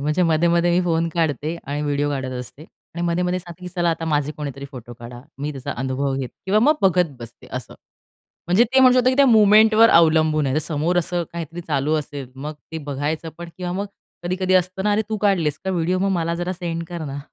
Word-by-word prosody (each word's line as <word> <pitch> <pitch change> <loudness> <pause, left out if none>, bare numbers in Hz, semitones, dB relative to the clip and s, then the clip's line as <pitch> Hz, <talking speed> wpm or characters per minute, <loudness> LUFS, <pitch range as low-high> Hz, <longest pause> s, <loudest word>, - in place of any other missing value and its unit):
म्हणजे 150 +5 +1
मध्ये-मध्ये 170 +1 +2
मी 175 +1 +3
फोन 165 -1 +1
काढते, 160 0 -1
आणि 145 +2 -3
व्हिडिओ 145 0 0
काढत 130 -2 -3
असते. 140 +4 -11 0.3
आणि 170 - -3
मध्ये-मध्ये 180 +1 0
सांगते, 175 0 -12
की - - -4
"चला, 175 -2 +1
आता 165 0 -3
माझे 150 -2 0
कोणीतरी 140 -2 -6
फोटो 120 -3 -10
काढा." 120 0 -10 0.2
मी 145 +2 -3
त्याचा 135 -3 -5
अनुभव 135 +2 -1
घेते, 135 -2 -4
किंवा 205 +3 +3
मग 295 +6 +5
बघत 180 -4 +3
बसते. 120 -1 -12
असं - - -6 0.7
म्हणजे 180 +7 +4
ते 265 +3 +2
म्हणू 255 -1 +7
शकतो, 255 +1 +4
की - - 0
त्या 280 0 +6
मोमेंटवर 220 0 +6
अवलंबून 155 -2 +4
आहे. 130 - 0
तर 155 - +2
समोर 160 +3 -1
असं 175 +1 -1
काहीतरी 170 0 -6
चालू 150 -2 -1
असेल, 145 -3 -7
मग 150 +3 -6 0.2
ते 160 - -3
बघायचं 145 +4 -3
पण 170 0 -7
किंवा 180 -1 -4
मग 200 +3 -3 0.4
कधी-कधी 185 +1 0
असतं 185 +1 +1
ना, 210 - +3
"अरे, 215 - +2
तू 220 - -2
काढलेस 165 -7 +1
का 190 - -1
व्हिडिओ? 180 0 0
मग 195 +1 +1
मला 165 0 -1
जरा 175 +2 -3
सेंड 170 -2 -4
कर 170 -2 -5
ना." 140 -1 -5
165 Hz, 220 wpm, -21 LUFS, 145-180 Hz, 0.7 s, म्हणू